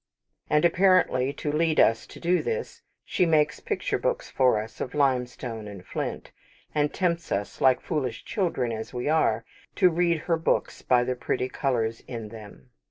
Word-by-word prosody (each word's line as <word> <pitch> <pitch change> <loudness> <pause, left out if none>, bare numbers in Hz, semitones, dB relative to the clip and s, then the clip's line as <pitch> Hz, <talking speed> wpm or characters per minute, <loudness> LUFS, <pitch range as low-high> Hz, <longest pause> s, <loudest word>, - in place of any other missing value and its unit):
And 150 +2 +3
apparently 170 -7 +3
to 150 - -3
lead 155 +1 +1
us 115 - +4
to - - -12
do 175 +1 +2
this, 465 0 -4 0.2
she - - +1
makes 155 -2 +2
picture - - -2
books - - -2
for 125 -5 +3
us 110 +1 -8
of 130 - -4
limestone 125 -5 -1
and 100 -3 -10
flint; - - -4 0.4
and 150 -1 +1
tempts 170 -3 -1
us, 100 +1 -3
like 130 -1 +5
foolish 130 -8 -3
children 165 - -1
as 110 +2 -6
we 125 - -2
are, 155 +1 +2 0.3
to 185 -3 +5
read 170 -1 +1
her 165 -2 +1
books 160 - -1
by 125 -1 +3
the 130 +1 -1
pretty 125 +1 -2
colours 115 -5 -1
in 115 -3 -6
them. 105 - -12
135 Hz, 170 wpm, -26 LUFS, 115-165 Hz, 0.4 s, like